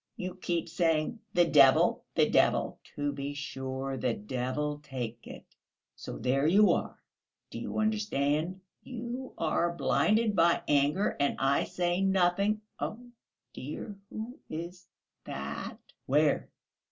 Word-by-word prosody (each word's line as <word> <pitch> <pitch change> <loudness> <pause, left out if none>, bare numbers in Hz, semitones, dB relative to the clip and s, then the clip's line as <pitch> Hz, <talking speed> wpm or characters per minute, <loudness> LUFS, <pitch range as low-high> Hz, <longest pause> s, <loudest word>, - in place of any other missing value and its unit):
You 185 0 -4
keep 175 -2 -2
saying, 165 +3 0 0.2
'The 175 -1 +6
devil, 135 -3 +5
the - - +4
devil!'" - - +2 0.2
"To 145 0 -1
be 140 0 -5
sure, 135 -1 -4
the 125 -2 0
devil 130 +6 -2
take 120 -5 -6
it; - - -10 0.5
so - - -7
there 135 +3 +1
you 205 +5 +6
are, - - -1 0.5
do - - -5
you - - -5
understand?" 185 -6 0 0.2
"You 250 +1 -6
are 165 +1 +1
blinded 215 +5 +2
by 170 -1 +4
anger, 145 +7 +2
and 140 - +2
I 135 +1 +2
say 175 +1 0
nothing. 195 +2 +2 0.2
Oh, 240 +3 -5 0.4
dear, 155 - -6
who 235 +7 -7
is 170 +3 -6 0.4
that?" 70 +1 -5 0.3
"Where?" 150 +2 +2
165 Hz, 130 wpm, -30 LUFS, 140-195 Hz, 0.5 s, The